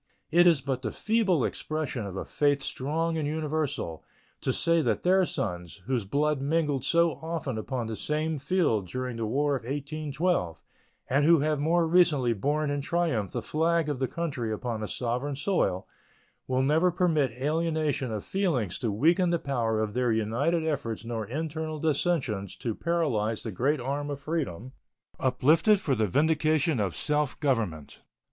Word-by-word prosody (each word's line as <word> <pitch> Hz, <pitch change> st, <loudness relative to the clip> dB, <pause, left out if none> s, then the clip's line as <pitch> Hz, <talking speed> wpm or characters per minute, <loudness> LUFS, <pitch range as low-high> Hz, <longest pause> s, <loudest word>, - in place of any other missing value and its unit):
It 175 Hz, +2 st, +6 dB
is 165 Hz, -5 st, +4 dB
but 130 Hz, -1 st, -2 dB
the 110 Hz, -4 st, -3 dB
feeble 210 Hz, -, +1 dB
expression 150 Hz, -8 st, -3 dB
of 95 Hz, -, -7 dB
a -, -, -4 dB
faith 145 Hz, -1 st, +1 dB
strong 160 Hz, +5 st, -1 dB
and 150 Hz, -, -1 dB
universal 150 Hz, -, -2 dB, 0.4 s
to -, -, 0 dB
say 170 Hz, 0 st, +2 dB
that 115 Hz, -7 st, 0 dB
their 185 Hz, 0 st, +4 dB
sons, 90 Hz, -, -4 dB
whose 125 Hz, -4 st, -1 dB
blood 145 Hz, +5 st, 0 dB
mingled 145 Hz, -2 st, 0 dB
so 170 Hz, +2 st, +2 dB
often 160 Hz, -6 st, -3 dB
upon 120 Hz, +2 st, -3 dB
the 110 Hz, 0 st, -4 dB
same 155 Hz, +4 st, -1 dB
field 140 Hz, -, +1 dB
during 125 Hz, +4 st, -4 dB
the 115 Hz, -1 st, -2 dB
War 140 Hz, +5 st, +1 dB
of 130 Hz, -, -3 dB
1812 145 Hz, -, -2 dB, 0.5 s
and 140 Hz, +3 st, +2 dB
who 165 Hz, 0 st, +5 dB
have 150 Hz, 0 st, +1 dB
more 165 Hz, +3 st, +2 dB
recently 160 Hz, -8 st, +3 dB
borne 145 Hz, +7 st, 0 dB
in 145 Hz, 0 st, -1 dB
triumph 150 Hz, -, 0 dB
the -, -, -3 dB
flag 165 Hz, 0 st, +1 dB
of 145 Hz, -3 st, -2 dB
the 130 Hz, -, +1 dB
country 140 Hz, -10 st, -3 dB
upon 110 Hz, 0 st, -3 dB
a 105 Hz, -, -3 dB
foreign 125 Hz, +5 st, -2 dB
soil, 145 Hz, -, 0 dB, 0.6 s
will 130 Hz, 0 st, +1 dB
never 160 Hz, +6 st, +3 dB
permit 165 Hz, -6 st, +2 dB
alienation 155 Hz, -3 st, 0 dB
of 105 Hz, -2 st, -3 dB
feeling 170 Hz, -, 0 dB
to 110 Hz, +5 st, -2 dB
weaken 170 Hz, -, +3 dB
the 170 Hz, -, +2 dB
power 120 Hz, -7 st, -1 dB
of 110 Hz, -1 st, -1 dB
their 125 Hz, 0 st, +1 dB
united 120 Hz, +10 st, 0 dB
efforts 125 Hz, -8 st, -2 dB
nor 115 Hz, -3 st, -3 dB
internal 155 Hz, +3 st, -3 dB
dissensions 140 Hz, -, 0 dB
to 115 Hz, +3 st, -3 dB
paralyze 120 Hz, -10 st, 0 dB
the 110 Hz, -, -4 dB
great 135 Hz, +9 st, +1 dB
arm 140 Hz, +3 st, -3 dB
of 140 Hz, -1 st, -4 dB
freedom, 140 Hz, -, -3 dB, 0.5 s
uplifted 155 Hz, +11 st, +4 dB
for 145 Hz, -, 0 dB
the 110 Hz, -4 st, +1 dB
vindication 155 Hz, -, +2 dB
of 95 Hz, -5 st, -1 dB
self 150 Hz, -2 st, -1 dB
government. 110 Hz, -, -1 dB
145 Hz, 165 wpm, -28 LUFS, 115-160 Hz, 0.6 s, It